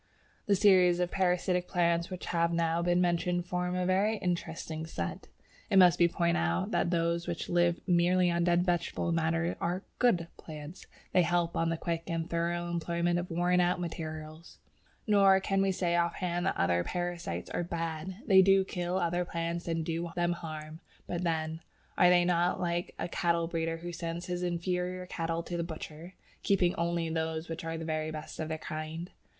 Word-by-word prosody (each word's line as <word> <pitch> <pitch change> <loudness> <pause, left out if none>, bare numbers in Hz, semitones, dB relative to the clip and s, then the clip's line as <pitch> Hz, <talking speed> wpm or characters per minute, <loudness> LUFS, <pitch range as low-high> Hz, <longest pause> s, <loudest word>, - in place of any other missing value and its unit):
The 200 - +4
series 185 -3 +5
of 180 0 0
parasitic 180 -1 +1
plants 170 -2 +1
which 185 -1 -6
have 170 0 +1
now 165 0 +1
been 175 +1 +2
mentioned 175 0 +1
form 180 0 -2
a 180 0 0
very 200 +4 +2
interesting 165 -3 -3
set. 85 - -5 0.4
It 195 - +3
must 180 -2 +7
be 170 - +6
pointed 170 0 +1
out 85 +2 0
that - - +1
those 170 0 0
which 175 -1 -4
live 175 0 +2
merely 180 0 +3
on 170 0 +1
dead 175 0 +3
vegetable 175 -1 0
matter 165 +1 0
are 180 +3 -1 0.2
"good" 180 -9 +3
plants. 155 +2 -9 0.3
They 185 - +6
help 175 0 +1
on 165 0 +1
the 165 - -1
quick 165 0 -3
and 165 0 -2
thorough 170 0 -1
employment 170 0 0
of 175 - -5
worn 175 +1 +2
out 180 0 +2
material. 155 -2 -5 0.6
Nor 195 -3 +5
can 195 0 0
we 195 0 +2
say 175 -2 0
off 170 0 +1
hand 175 0 -1
that - - 0
other 85 0 +2
parasites 175 - -4
are - - -1
"bad." 165 +1 -4
They 190 -4 +7
do 195 0 +5
kill 180 -1 -2
other 175 0 0
plants 170 0 -3
and 165 -1 -1
do 170 +1 -2
them 175 0 +1
harm, 155 -2 -7 0.3
but 175 0 -3
then, 160 -1 -1 0.4
are 180 - +6
they 175 -1 +5
not 175 0 +2
like 175 -1 -2
a - - -3
cattle 170 -1 +1
breeder 165 -1 -2
who 175 +1 -6
sends 170 +1 -4
his 180 0 -3
inferior 180 +1 -2
cattle 165 -1 -3
to 175 0 -4
the 170 - -1
butcher, 165 +1 -8 0.3
keeping 180 -3 +2
only 170 0 -1
those 160 0 -2
which 165 0 -5
are 165 0 -3
the 165 - -5
very 155 -1 -2
best 155 0 -7
of 160 - -2
their 160 - -2
kind? 155 +3 -6
170 Hz, 190 wpm, -30 LUFS, 165-180 Hz, 0.6 s, must